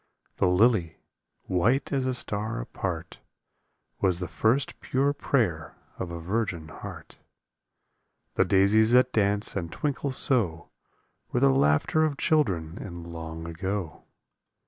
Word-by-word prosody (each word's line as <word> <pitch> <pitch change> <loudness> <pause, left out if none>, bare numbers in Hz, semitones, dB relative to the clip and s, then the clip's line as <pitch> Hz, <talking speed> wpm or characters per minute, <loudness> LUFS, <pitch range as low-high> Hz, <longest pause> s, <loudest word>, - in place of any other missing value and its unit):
The - - +3
lily, 90 -2 +3 0.5
white 110 +10 +1
as 135 -2 0
a 130 - 0
star 110 -1 -3
apart, 85 -3 -5 0.8
Was 90 -3 +2
the 90 -1 -4
first 120 +10 0
pure 140 +2 +1
prayer 105 - -1 0.2
of 90 - -3
a 85 0 -5
virgin 90 -3 -2
heart. - - -10 1.1
The - - +3
daisies 105 +4 +4
that 125 0 +5
dance 105 -1 +1
and 85 -4 -3
twinkle 140 - -2
so 105 - 0 0.6
Were 125 - +1
the 135 +1 +5
laughter 135 - +3
of 150 -3 0
children 90 - +1
in 85 -4 -7
long 80 -1 -7
ago. 95 0 -4
100 Hz, 125 wpm, -27 LUFS, 85-125 Hz, 1.1 s, that